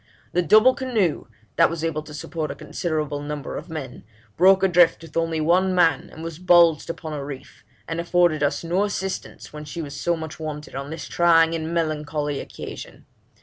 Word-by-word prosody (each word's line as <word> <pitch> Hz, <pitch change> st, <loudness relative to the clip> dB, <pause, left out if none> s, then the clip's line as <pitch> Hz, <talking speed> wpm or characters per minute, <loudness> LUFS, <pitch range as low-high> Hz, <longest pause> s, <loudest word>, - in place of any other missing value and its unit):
The 180 Hz, -, +2 dB
double 215 Hz, +9 st, +6 dB
canoe, 230 Hz, -, -1 dB, 0.3 s
that 165 Hz, -, +5 dB
was 165 Hz, -1 st, -5 dB
able 160 Hz, -2 st, -1 dB
to 150 Hz, 0 st, -12 dB
support 155 Hz, +1 st, -4 dB
a -, -, -5 dB
considerable 155 Hz, -4 st, -3 dB
number 145 Hz, 0 st, -5 dB
of -, -, -7 dB
men, 140 Hz, -6 st, -7 dB, 0.3 s
broke 190 Hz, +2 st, +5 dB
adrift 175 Hz, -3 st, +4 dB
with 165 Hz, -, -13 dB
only 165 Hz, -1 st, 0 dB
one 180 Hz, +4 st, +2 dB
man, 165 Hz, -5 st, +2 dB
and 160 Hz, -, -10 dB
was 165 Hz, -1 st, -6 dB
bulged 170 Hz, -4 st, +4 dB
upon 160 Hz, -2 st, -5 dB
a 145 Hz, -2 st, -4 dB
reef, 140 Hz, -5 st, -9 dB, 0.2 s
and 165 Hz, 0 st, -3 dB
afforded 170 Hz, -2 st, +2 dB
us 145 Hz, +2 st, 0 dB
no 175 Hz, +4 st, +1 dB
assistance 190 Hz, -5 st, -5 dB
when 150 Hz, 0 st, -7 dB
she 150 Hz, +3 st, -7 dB
was 145 Hz, -3 st, -6 dB
so 170 Hz, +4 st, 0 dB
much 160 Hz, -1 st, -7 dB
wanted 150 Hz, -1 st, -6 dB
on 140 Hz, +1 st, -5 dB
this 160 Hz, -, -6 dB
trying 165 Hz, -1 st, +4 dB
and 160 Hz, 0 st, -3 dB
melancholy 150 Hz, -3 st, -2 dB
occasion. -, -, -9 dB
165 Hz, 190 wpm, -23 LUFS, 150-175 Hz, 0.3 s, double